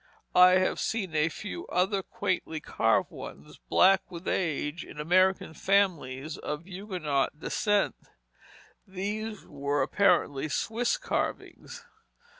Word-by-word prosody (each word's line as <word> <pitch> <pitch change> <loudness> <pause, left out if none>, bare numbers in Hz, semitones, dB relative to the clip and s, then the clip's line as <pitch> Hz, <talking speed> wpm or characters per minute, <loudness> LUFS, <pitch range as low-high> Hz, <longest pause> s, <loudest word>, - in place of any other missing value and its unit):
I 180 0 +8
have 185 0 +2
seen 195 -7 -2
a 155 +1 +3
few 215 - -7
other 190 +2 +1
quaintly 170 -4 -3
carved - - +1
ones, - - -10
black 190 +1 +5
with 170 +1 -9
age, 155 -2 -1
in - - -11
American 185 +2 +2
families 160 -8 0
of 150 +3 -5
Huguenot 180 -7 -2
descent; 205 +3 +1 0.9
these 210 +3 -4
were 140 0 -1
apparently 160 -5 +2
Swiss 235 - 0
carvings. - - -4
185 Hz, 110 wpm, -28 LUFS, 155-200 Hz, 0.9 s, I